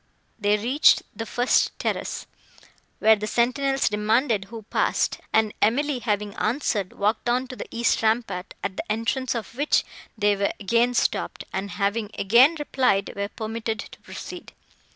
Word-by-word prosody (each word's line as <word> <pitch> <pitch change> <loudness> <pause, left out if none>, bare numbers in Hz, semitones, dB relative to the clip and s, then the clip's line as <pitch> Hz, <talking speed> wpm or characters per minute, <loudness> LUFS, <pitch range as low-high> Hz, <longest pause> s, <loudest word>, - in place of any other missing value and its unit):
They 205 0 +2
reached 250 +8 +4
the 225 - -5
first 245 +4 +2
terrace, - - -3 0.7
where 220 0 +5
the 210 0 -4
sentinels 270 +4 +1
demanded 215 +1 +1
who 225 +1 -9
passed; - - 0
and 220 -1 +2
Emily, 270 +5 +2
having 210 -3 -1
answered, 215 -5 -1
walked 215 +3 0
on 250 +2 +1
to 255 - -7
the - - -7
east 235 0 +1
rampart, 220 -5 -1
at 195 -1 -3
the - - -4
entrance 230 +4 -1
of 230 -1 -5
which 290 +5 +2 0.3
they 205 -1 +3
were 200 0 0
again 235 +4 +2
stopped; - - 0
and, 195 +1 -3
having 205 +2 0
again 245 +11 +5
replied, 255 -9 +1
were 200 0 -3
permitted 225 0 -4
to - - -9
proceed. - - -9
225 Hz, 150 wpm, -24 LUFS, 205-245 Hz, 0.7 s, where